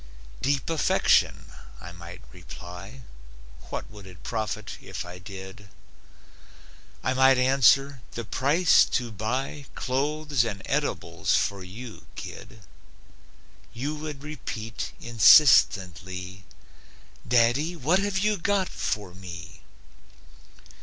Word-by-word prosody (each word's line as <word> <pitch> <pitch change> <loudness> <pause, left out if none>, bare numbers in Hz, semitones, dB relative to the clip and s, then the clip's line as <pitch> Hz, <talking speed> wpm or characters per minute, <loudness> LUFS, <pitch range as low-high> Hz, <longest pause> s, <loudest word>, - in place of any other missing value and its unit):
"Deep 135 -1 0
affection," 165 -2 +2 0.3
I 85 - -9
might 85 +1 -11
reply; 90 +6 -10 0.7
What - - -5
would 100 -2 -12
it 90 0 -14
profit 110 -2 -4
if - - -6
I 90 +1 -9
did? 95 +1 -10 1.3
I 130 - +1
might 130 0 +5
answer: 135 +1 +4
"The 115 - -5
price 150 - +4
to 120 -2 -5
buy 125 +7 -3
Clothes 145 +1 0
and 100 -4 -5
edibles - - -1
for 100 -2 0
you, 110 +6 -10
kid." 110 -1 -9 1.1
You 140 +6 -3
would 150 -2 -7
repeat, 115 -7 -6
insistently: 95 - +4 0.8
"Daddy, 125 +8 +3
what 165 +5 +2
have 200 -1 -1
you 210 +2 +1
got 195 +1 0
for 100 -4 -3
me?" 85 -3 -10
120 Hz, 105 wpm, -26 LUFS, 95-140 Hz, 1.3 s, might